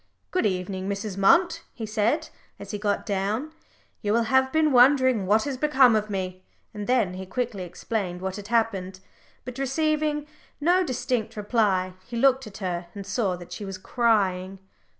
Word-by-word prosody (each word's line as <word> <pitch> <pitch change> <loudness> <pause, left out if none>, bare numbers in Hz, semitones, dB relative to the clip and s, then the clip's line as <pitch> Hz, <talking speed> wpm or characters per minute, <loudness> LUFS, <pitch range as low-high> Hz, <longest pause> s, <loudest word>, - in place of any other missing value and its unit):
"Good 365 -12 +2
evening, 185 0 -3
Mrs. 200 0 -3
Munt," 335 - +4 0.2
he 225 - -5
said, 225 +9 0 0.3
as 200 -1 -9
he 210 - -4
got 205 -1 -1
down; 210 +8 -1 0.5
"you 205 -1 0
will 235 +1 +3
have 265 +3 +2
been 315 0 +3
wondering 255 -5 +5
what 215 +3 +4
has 280 -2 -3
become 265 -4 +5
of 215 0 0
me," 185 -2 -4 0.3
and 210 -1 -6
then 240 -7 +2
he 190 0 -7
quickly 230 -1 -3
explained 180 +1 -4
what 190 0 -4
had 205 -1 -8
happened. 200 -5 0 0.5
But 250 +1 -7
receiving 300 +2 0 0.3
no 350 +5 +3
distinct 250 -6 -2
reply, 205 -4 +1
he 235 - -5
looked 265 0 +3
at 195 -2 -10
her, 175 -3 -3
and 200 -1 -7
saw 190 -1 0
that 175 -1 -12
she - - -6
was 195 -1 -5
crying. 195 -4 +1
215 Hz, 170 wpm, -25 LUFS, 190-260 Hz, 0.5 s, wondering